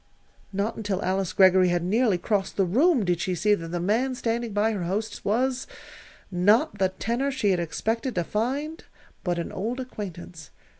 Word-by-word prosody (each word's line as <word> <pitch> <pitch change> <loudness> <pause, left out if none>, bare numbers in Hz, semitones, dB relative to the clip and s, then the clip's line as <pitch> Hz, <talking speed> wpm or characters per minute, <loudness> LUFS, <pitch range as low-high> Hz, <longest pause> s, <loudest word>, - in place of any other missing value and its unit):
Not 200 +3 -1
until 205 -3 -2
Alice 190 0 0
Greggory 185 -1 +5
had 175 -1 +1
nearly 210 +1 +2
crossed 195 +1 -1
the 195 - +3
room 255 - +3
did 175 -1 0
she 185 - -1
see 210 +5 +3
that 165 -5 -2
the 175 +1 -3
man 230 +9 +1
standing 235 -1 -2
by 210 +2 +2
her 205 -4 -3
hostess 210 +4 -3
was 250 +5 0 0.6
not 205 - +3
the 190 -1 +3
tenor 235 +8 -1
she 260 -7 +1
had 180 - +1
expected 225 - -2
to 175 - +1
find 275 - -2 0.4
but 175 -2 -1
an 170 - -3
old 230 +7 -3
acquaintance. 180 - -7
205 Hz, 180 wpm, -26 LUFS, 185-235 Hz, 0.6 s, Greggory